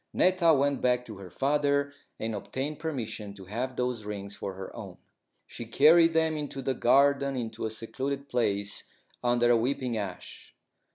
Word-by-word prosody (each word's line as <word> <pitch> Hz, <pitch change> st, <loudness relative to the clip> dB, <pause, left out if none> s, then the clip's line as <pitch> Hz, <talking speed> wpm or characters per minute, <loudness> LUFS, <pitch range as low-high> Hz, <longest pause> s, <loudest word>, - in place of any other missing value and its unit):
Netta 185 Hz, -2 st, +4 dB
went 140 Hz, 0 st, +1 dB
back 125 Hz, -1 st, +2 dB
to 110 Hz, -4 st, -9 dB
her 95 Hz, -2 st, -10 dB
father 140 Hz, +5 st, +1 dB, 0.3 s
and 110 Hz, 0 st, -2 dB
obtained 135 Hz, +8 st, -4 dB
permission 115 Hz, -9 st, -4 dB
to 95 Hz, -2 st, -11 dB
have 125 Hz, +7 st, -4 dB
those 125 Hz, -3 st, -2 dB
rings 100 Hz, -1 st, -6 dB
for 95 Hz, -1 st, -5 dB
her 95 Hz, 0 st, -8 dB
own. -, -, -8 dB, 0.5 s
She 120 Hz, -, -8 dB
carried 165 Hz, +7 st, +6 dB
them 160 Hz, 0 st, +2 dB
out -, -, -3 dB
into 140 Hz, -2 st, -5 dB
the 135 Hz, -, 0 dB
garden 140 Hz, +2 st, +3 dB
into 115 Hz, -2 st, -3 dB
a -, -, -4 dB
secluded 135 Hz, +5 st, -4 dB
place 105 Hz, -5 st, 0 dB, 0.4 s
under 120 Hz, 0 st, +3 dB
a 120 Hz, -, +5 dB
weeping 125 Hz, 0 st, -1 dB
ash. 100 Hz, -4 st, -7 dB
125 Hz, 170 wpm, -28 LUFS, 110-140 Hz, 0.5 s, carried